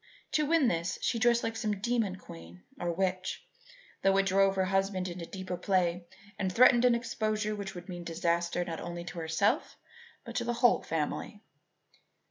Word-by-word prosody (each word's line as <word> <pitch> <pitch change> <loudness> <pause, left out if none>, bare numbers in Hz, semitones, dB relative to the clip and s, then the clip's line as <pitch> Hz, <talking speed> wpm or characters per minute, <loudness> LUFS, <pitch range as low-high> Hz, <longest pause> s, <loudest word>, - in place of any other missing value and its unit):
To 300 -1 +2
win 320 -4 +4
this, 170 -3 -1
she 230 - +1
dressed 235 0 +3
like 225 0 -2
some 215 -3 -2
demon 225 -3 0
queen 85 - -12 0.2
or 175 0 -1
witch, 185 +1 -2 0.6
though 195 0 +3
it 195 - +3
drove 195 0 +3
her 190 -1 +2
husband 195 -1 0
into 175 -1 -6
deeper 185 -1 -5
play 180 -2 0 0.3
and 190 -2 0
threatened 240 +3 +6
an 245 -1 +5
exposure 215 -2 -1
which 200 -2 -6
would 175 - -9
mean 175 -2 -6
disaster 170 +1 0
not 165 -1 -5
only 175 0 -5
to 175 0 -7
herself 160 +5 0 0.5
but 235 - -7
to 240 - 0
the 240 0 -1
whole 245 0 +4
family. 165 +6 -3
190 Hz, 175 wpm, -30 LUFS, 175-220 Hz, 0.6 s, threatened